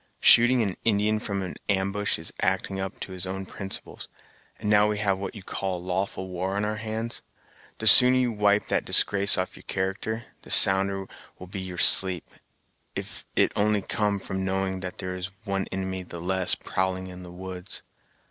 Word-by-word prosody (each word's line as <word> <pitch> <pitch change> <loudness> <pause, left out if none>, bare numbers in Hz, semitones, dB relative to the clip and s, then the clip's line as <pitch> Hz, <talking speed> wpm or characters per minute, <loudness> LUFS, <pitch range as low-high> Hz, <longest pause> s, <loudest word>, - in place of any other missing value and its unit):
Shooting 120 +1 +6
an 100 -3 -3
Indian 105 0 +2
from 100 -3 -3
an 90 - -6
ambush 100 +1 0
is 80 - -7
acting 95 +1 0
up 95 0 -5
to - - -6
his 95 0 -4
own 95 +1 -5
principles, 95 +1 -7 0.5
and - - -6
now 105 0 +5
we 105 0 -1
have 100 -2 +1
what 100 +3 -6
you 100 - -10
call 95 0 -3
a 90 - -10
lawful 95 +1 -3
war 95 +1 -3
on 100 +1 0
our 105 0 -2
hands, 110 +1 -4 0.6
the 110 - -6
sooner 125 +4 +8
you 125 -2 +1
wipe 105 -1 +2
that - - +1
disgrace 100 0 +4
off 95 0 -3
your - - -13
character, 100 +4 -3 0.2
the - - -15
sounder 95 0 +6 0.3
will 90 - -10
be 95 +1 -6
your 90 -1 -7
sleep; 95 -2 +4 0.7
if - - -7
it - - +3
only 105 -1 +1
come 105 0 0
from 95 0 -4
knowing 95 0 -1
there 90 0 -5
is 90 +3 -8
one 95 -1 -2
inimy 95 0 -4
the 85 -1 -9
less 95 +1 +1
prowling 95 0 -2
in 90 0 -10
the 90 -1 -10
woods. 90 +1 -8
95 Hz, 185 wpm, -26 LUFS, 95-105 Hz, 0.7 s, sooner